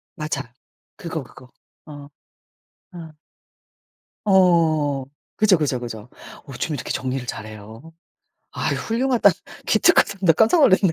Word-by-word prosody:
맞아. 145 -6 -5 0.4
그거, 165 -4 -6
그거. 125 +1 -16 0.4
어. 145 -2 -11 0.8
아. 165 -3 -10 1.1
어 165 -7 +3 0.3
그죠, 205 -4 +4
그죠, 140 -5 -1
그죠. 115 -1 -8 0.4
어쩜 145 +3 -4
이렇게 - - -5
정리를 130 -1 -3
잘해요. 110 +8 -9 0.6
아 - - -2
훌륭하다. 245 +2 +2 0.4
기특하다. 195 - +3
나 165 -3 +6
깜짝 225 - +3
놀랐네요. 190 - +4
155 Hz, 230 characters per minute, -22 LUFS, 130-185 Hz, 1.1 s, 나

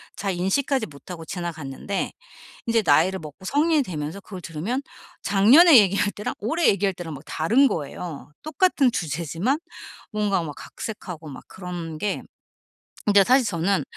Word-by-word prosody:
잘 195 -2 -2
인식하지 220 +8 0
못하고 165 +3 -10
지나갔는데 170 +1 -4 0.6
이제 230 -1 +3
나이를 180 +6 +4
먹고 155 +4 -11
성인이 295 - +2
되면서 155 -1 -5
그걸 190 -2 -9
들으면 175 - -3 0.4
작년에 255 - +7
얘기할 200 +1 +2
때랑 210 - -4
올해 325 +11 +1
얘기할 195 -1 +2
때랑 165 -3 -6
막 135 - -8
다른 240 - +3
거예요. 150 - -5
똑같은 305 -4 +2
주제지만 170 - -1 0.5
뭔가 205 -3 +1
막 150 -3 -6
각색하고 180 -8 -7
막 135 - -10
그런 175 -3 -6
게. 205 -1 -1 0.8
근데 200 -1 +6
사실 255 +3 +4
저는 185 +1 0
190 Hz, 325 characters per minute, -24 LUFS, 165-230 Hz, 0.8 s, 작년에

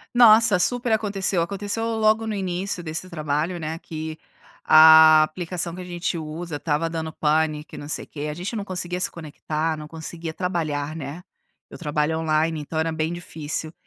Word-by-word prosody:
Nossa, 220 -4 +7
super 245 +4 0
aconteceu, 200 -4 0
aconteceu 200 +5 -3
logo 220 0 +2
no 220 - -2
início 185 -1 -3
desse 160 +3 -5
trabalho, 155 +1 -2
né, 160 0 -5
que, 160 -1 -6 0.5
a 155 0 +8
aplicação 170 +2 -4
que 180 - -8
a - - -6
gente 175 -1 -3
usa, 160 0 -5
estava 155 +2 -1
dando 160 -1 -4
pane 155 -1 +1
que - - -12
não 145 - -8
sei 150 - -4
quê, 150 0 -6
a - - -3
gente 180 +8 -5
não 210 - -3
conseguia 180 -2 -4
se 180 - +1
conectar, 155 0 -3
não 150 - -8
conseguia 165 +1 -7
trabalhar, 155 -5 -2
né. 150 +4 -7 0.5
Eu - - -10
trabalho 150 0 -1
online, 160 0 +1
então, 150 +2 -6
era 160 +1 0
bem 160 +1 -2
difícil. 160 -2 -5
165 Hz, 175 wpm, -23 LUFS, 155-180 Hz, 0.5 s, a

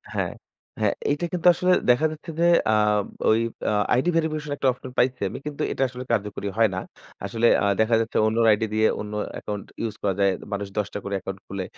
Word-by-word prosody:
হ্যাঁ, - - -1 0.5
হ্যাঁ - - +3 0.2
এইটা 150 +4 -1
কিন্তু 180 -1 +1
আসলে 180 +2 +1 0.2
দেখা 125 +6 +2
যাচ্ছে 155 +2 -8
যে, 170 - +4 0.3
আ - - +3 0.6
ওই 110 - +4 0.3
আ - - +1 0.2
আইডি 130 +8 +2
ভেরিফিকেশন 155 -2 -1
একটা 135 - 0
অপশন 125 +1 -9
পাইছি 125 -2 +1
আমি, - - -6
কিন্তু 145 -1 -5
এটা - - 0
আসলে 125 0 -7
কার্যকরী 105 -2 -1
হয় 115 -1 +4
না। - - -1 0.5
আসলে 115 +4 +1 0.2
আ - - +2 0.2
দেখা 110 +1 +3
যাচ্ছে 115 - -3
অন্যর 115 +1 +2
আইডি 105 +1 +2
দিয়ে 110 0 +3
অন্য 105 0 -7 0.2
অ্যাকাউন্ট 105 -2 -5 0.2
ইউস 115 -2 -3
করা 100 -2 +1
যায়। 100 -1 +4 0.2
মানুষ 100 0 -3
১০ 105 -2 +1
টা 105 - -3
করে 100 - -4
অ্যাকাউন্ট 95 0 -6
খুলে, 100 -1 -4
115 Hz, 210 wpm, -24 LUFS, 105-140 Hz, 0.6 s, যে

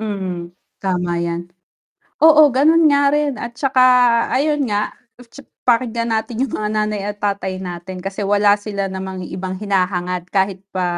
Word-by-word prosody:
Mm, 190 -5 -4 0.3
tama 180 -3 -1
yan, 170 +1 -4 0.7
oo, 310 -2 +7
gano'n 315 +6 +4
nga 280 0 +4
rin 295 0 +1
at 235 0 -7
tsaka 265 0 +1 0.5
ayon 295 +3 +1
nga, 205 0 -1 0.3
tsa 240 +4 -14 0.2
pakinggan 235 -1 +1
natin 225 +1 -2
'yong 270 - -7
mga 210 - -2
nanay 215 -1 -1
at 205 - -5
tatay 200 -2 -2
natin, 185 0 -7
kasi 195 +1 -5
wala 205 0 +4
sila 200 -2 -4
namang 190 -1 -6
ibang 185 +1 -5
hinahangad, 180 -3 -1
kahit 190 0 0
pa 185 -2 -3
205 Hz, 155 wpm, -19 LUFS, 185-235 Hz, 0.7 s, oo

